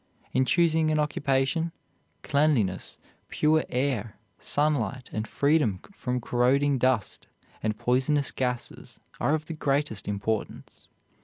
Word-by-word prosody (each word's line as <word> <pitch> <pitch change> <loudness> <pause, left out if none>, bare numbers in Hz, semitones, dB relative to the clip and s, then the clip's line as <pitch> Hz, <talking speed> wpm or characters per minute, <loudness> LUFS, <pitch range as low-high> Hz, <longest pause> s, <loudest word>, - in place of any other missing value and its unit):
In 130 0 +3
choosing 160 0 +3
an 155 - +2
occupation, 145 +2 0 0.5
cleanliness, 140 -11 +1 0.3
pure 155 +1 +2
air, 125 -5 -1 0.2
sunlight, 140 -4 0
and 110 0 -2
freedom 140 - +2
from 125 -8 -2
corroding 130 +4 +2
dust 125 -5 0 0.3
and 105 -1 -1
poisonous 130 +5 +1
gases 125 -2 -4 0.2
are 150 - +2
of 155 -1 -4
the 165 - -5
greatest 140 -7 -1
importance. 105 +1 -4
135 Hz, 110 wpm, -27 LUFS, 120-150 Hz, 0.5 s, In